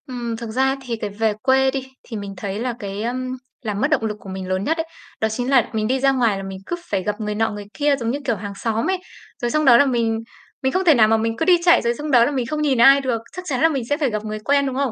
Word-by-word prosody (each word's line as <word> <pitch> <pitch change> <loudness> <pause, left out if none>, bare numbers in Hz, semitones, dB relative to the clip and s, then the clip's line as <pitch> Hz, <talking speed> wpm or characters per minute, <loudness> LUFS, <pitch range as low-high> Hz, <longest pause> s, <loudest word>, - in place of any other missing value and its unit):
Ừm, 240 -3 -4
thực 230 -1 -6
ra 265 +4 +1
thì 245 -3 -4
cái 215 -2 -4
về 215 +2 0
quê 265 0 +3
đi, 265 -1 -4 0.2
thì 225 - -7
mình 200 -1 -6
thấy 200 +2 -4
là 245 +1 -2
cái, 200 0 -5
ơm, 255 +2 -3 0.2
làm 210 -4 -3
mất - - +3
động 275 -7 +2
lực 210 -1 -3
của 195 - -11
mình 190 0 -5
lớn 185 +1 -1
nhất 320 +9 0
ấy, 325 - -1 0.4
đó 220 - +2
chính 245 +3 -3
là 265 -4 +4
mình 215 -1 0
đi 260 +3 +1
ra 270 +1 +4
ngoài 235 -6 +1
là 195 - -6
mình 190 0 -6
cứ 345 - -2 0.2
phải 195 -2 0
gặp 210 +2 -3
người 210 0 -2
nọ 225 +1 +1
người 205 -1 -7
kia 290 -1 +2
giống 235 -4 -2
như 280 - -2
kiểu 235 - +1
hàng 205 0 -6
xóm 225 - -1
ấy. 380 - +1 0.4
Rồi 240 -1 -1
xong 305 +2 +1
đó 240 -3 +8
là 285 - +5
mình 230 -4 0 0.4
mình 265 - +2
không 370 +5 0
thể 325 - +7
nào 225 -5 +5
mà 225 +1 +3
mình 225 +1 -1
cứ - - 0
đi 360 -1 +6
chạy, 345 -1 +6
rồi 235 0 +1
xong 295 +5 -5
đó 240 -3 +6
là 290 - 0
mình 260 -4 -1
không 305 +4 -3
nhìn 280 -4 +2
ai 275 +4 +7
được, 245 -4 -1
chắc 365 0 -7
chắn 270 -3 -1
là 325 - +5
mình 275 -6 -2
sẽ 290 - +1
phải 290 -4 +1
gặp 215 -1 -4
người 215 0 -4
quen, 280 +5 +2
đúng 265 -2 -3
không? 270 -2 0
240 Hz, 320 wpm, -21 LUFS, 215-270 Hz, 0.4 s, đó